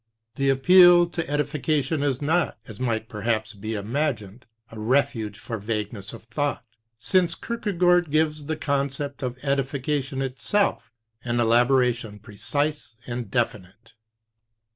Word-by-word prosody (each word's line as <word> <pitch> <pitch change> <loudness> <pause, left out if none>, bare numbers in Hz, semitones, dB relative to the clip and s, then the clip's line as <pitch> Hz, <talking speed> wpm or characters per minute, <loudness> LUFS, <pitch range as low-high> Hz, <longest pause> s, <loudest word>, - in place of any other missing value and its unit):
The 135 0 0
appeal 175 +5 +7
to 170 -4 -4
edi 145 0 +2
fication 150 0 -1
is 140 -1 -1
not, 160 -1 +1
as 110 0 -10
might 115 -3 -1
perhaps 110 0 -2
be 110 +2 -5
imagined, 115 0 -3 0.2
a 110 - -9
refuge 115 -3 0
for 115 0 -6
vagueness 105 0 -4
of 115 - -11
thought, 140 +3 -2 0.3
since 170 - +2
Kierkegaard 180 -7 +1
gives 155 -1 0
the 160 0 -2
concept 140 -1 -2
of 125 -1 -3
edification 135 0 -1
itself 165 +10 -1 0.3
an 120 -1 -1
elaboration 120 -2 +2
precise 145 +6 -3
and 120 -3 -5
definite. 105 -2 -3
135 Hz, 125 wpm, -25 LUFS, 115-150 Hz, 0.3 s, appeal